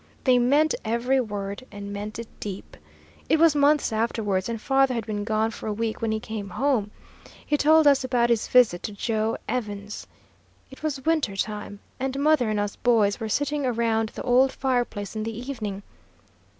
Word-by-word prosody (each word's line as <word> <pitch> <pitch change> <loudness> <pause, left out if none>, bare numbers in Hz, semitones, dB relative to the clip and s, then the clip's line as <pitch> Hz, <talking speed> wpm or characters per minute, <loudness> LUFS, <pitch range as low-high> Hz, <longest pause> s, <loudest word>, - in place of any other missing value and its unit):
They 255 -2 +4
meant 290 +6 +3
every 240 +4 +1
word 205 0 -5
and 200 -1 -7
meant 205 +1 -5
it 230 -1 -6
deep. 200 -2 -7 0.5
It 315 - +4
was 325 -1 +5
months 290 -3 +3
afterwards, 215 -3 -1
and 230 -1 -3
father 270 +1 +2
had 230 -3 -3
been 210 -2 -3
gone 220 +1 0
for - - -8
a 215 - -1
week 220 +1 -3
when 225 -1 0
he 220 - -1
came 215 -2 -6
home. 220 +1 0 0.6
He 295 - +1
told 310 +2 +5
us 280 -2 +5
about 245 -2 +1
his 230 -2 +1
visit 240 -9 +4
to 210 - -5
Joe 220 +1 -1
Evans. 210 -4 -4 0.6
It 270 - -13
was 280 -4 -3
winter 315 -11 +1
time, 205 0 -4 0.2
and 265 +1 -2
mother 285 -5 +3
and 215 -1 0
us 205 -1 -3
boys 220 -4 +2
were 220 -2 -4
sitting 290 +4 0
around 230 -3 0
the - - -8
old 260 +2 +4
fireplace 245 -7 -2
in 215 - -2
the 225 0 -4
evening. 220 -6 -5
230 Hz, 185 wpm, -25 LUFS, 210-265 Hz, 0.6 s, was